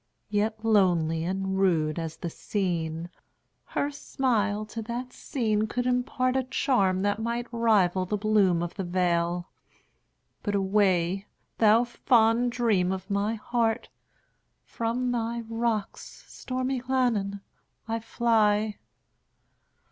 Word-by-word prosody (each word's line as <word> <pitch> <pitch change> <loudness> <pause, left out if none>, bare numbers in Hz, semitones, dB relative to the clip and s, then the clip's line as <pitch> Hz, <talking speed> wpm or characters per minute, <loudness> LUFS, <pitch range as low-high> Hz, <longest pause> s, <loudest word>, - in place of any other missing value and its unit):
Yet 215 +1 -1
lonely 175 -7 +3
and 190 +1 -2
rude 165 -4 +2
as 160 -1 -5
the 170 - -4
scene, 170 -4 -2 0.5
Her 285 - -2
smile 215 -7 -1
to 225 +2 -6
that 245 +3 -5
scene 220 -5 -1
could 245 +3 -2
impartA 255 +1 0
charm 190 -11 +2
that 205 +1 +1
might 235 +1 -2
rival 200 -6 +2
the 210 - -1
bloom 200 -5 +3
of 175 - -4
the 195 - -4
vale,—But 175 +3 -4
away, 195 -1 +1 0.3
thou 220 +1 +6
fond 240 -1 +2
dream 215 -7 +1
of 190 +1 -5
my 205 +3 0
heart! 230 +1 -1 0.7
From 240 +2 -2
thy 235 0 -2
rocks, 225 -2 -3
stormy 255 0 -3
Llannon, 235 -6 0 0.5
I 225 0 -1
fly. 215 -2 +1
215 Hz, 110 wpm, -27 LUFS, 190-235 Hz, 0.7 s, thou